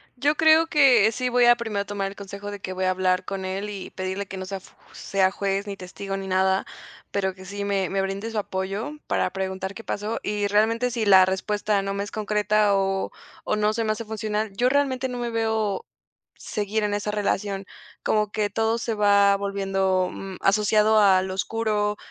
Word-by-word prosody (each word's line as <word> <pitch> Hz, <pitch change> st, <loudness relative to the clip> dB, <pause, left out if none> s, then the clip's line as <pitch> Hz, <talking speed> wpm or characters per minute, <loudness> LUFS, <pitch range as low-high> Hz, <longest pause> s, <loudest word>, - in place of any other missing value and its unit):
Yo 290 Hz, +4 st, +1 dB
creo 320 Hz, +1 st, +5 dB
que 260 Hz, -9 st, +5 dB
sí 250 Hz, +2 st, -2 dB
voy 245 Hz, 0 st, +4 dB
a 240 Hz, 0 st, +7 dB
primero 220 Hz, -4 st, -3 dB
a -, -, -5 dB
tomar 200 Hz, -1 st, -3 dB
el 195 Hz, -, -8 dB
consejo 200 Hz, +1 st, -7 dB
de 205 Hz, -, -7 dB
que 185 Hz, -1 st, -5 dB
voy 185 Hz, 0 st, -2 dB
a 185 Hz, -, +3 dB
hablar 185 Hz, 0 st, +1 dB
con 195 Hz, -1 st, -4 dB
él 195 Hz, +2 st, -3 dB
y 195 Hz, -2 st, -6 dB
pedirle 190 Hz, +1 st, -4 dB
que 190 Hz, -, -7 dB
no 185 Hz, -, -5 dB
sea 195 Hz, +1 st, -4 dB
f -, -, -19 dB, 0.2 s
sea 190 Hz, -1 st, +1 dB
juez 200 Hz, +1 st, -2 dB
ni 200 Hz, -, -5 dB
testigo 195 Hz, +2 st, -6 dB
ni 195 Hz, -, -6 dB
nada, 190 Hz, 0 st, +2 dB, 0.5 s
pero 190 Hz, -2 st, -1 dB
que 190 Hz, 0 st, -13 dB
sí 200 Hz, +1 st, -5 dB
me 195 Hz, -2 st, 0 dB
me 195 Hz, 0 st, 0 dB
brinde 195 Hz, +3 st, -3 dB
su 220 Hz, -, -4 dB
apoyo 195 Hz, +7 st, -3 dB
para -, -, +1 dB
preguntar 190 Hz, 0 st, -4 dB
qué 225 Hz, -, -9 dB
pasó 210 Hz, +3 st, -3 dB
y 205 Hz, -1 st, -1 dB
realmente 225 Hz, +4 st, +2 dB
si 230 Hz, -2 st, -1 dB
la 190 Hz, -2 st, +7 dB
respuesta 205 Hz, +2 st, 0 dB
no 195 Hz, 0 st, -3 dB
me 200 Hz, -, -2 dB
es 205 Hz, -, -8 dB
concreta 210 Hz, -1 st, +2 dB
o 195 Hz, 0 st, 0 dB, 0.3 s
o -, -, 0 dB
no 210 Hz, 0 st, +1 dB
se 230 Hz, 0 st, -1 dB
me 215 Hz, -, 0 dB
hace 225 Hz, +1 st, -6 dB
funcional, 215 Hz, 0 st, -2 dB
yo 245 Hz, +4 st, +3 dB
realmente 265 Hz, -2 st, +1 dB
no 250 Hz, -, -5 dB
me 240 Hz, -1 st, -2 dB
veo 220 Hz, -3 st, -1 dB, 0.6 s
seguir 210 Hz, +1 st, -2 dB
en 205 Hz, 0 st, 0 dB
esa 210 Hz, 0 st, -2 dB
relación, 200 Hz, -1 st, -1 dB, 0.4 s
como 210 Hz, -1 st, +1 dB
que 210 Hz, -1 st, 0 dB
todo 225 Hz, +2 st, 0 dB
se 225 Hz, -1 st, -2 dB
va 200 Hz, -1 st, +5 dB
volviendo, 195 Hz, -2 st, 0 dB
mm, 190 Hz, -1 st, -7 dB
asociado 210 Hz, +2 st, +4 dB
al 190 Hz, -2 st, +4 dB
oscuro, 210 Hz, +1 st, -1 dB
205 Hz, 210 wpm, -24 LUFS, 195-220 Hz, 0.6 s, a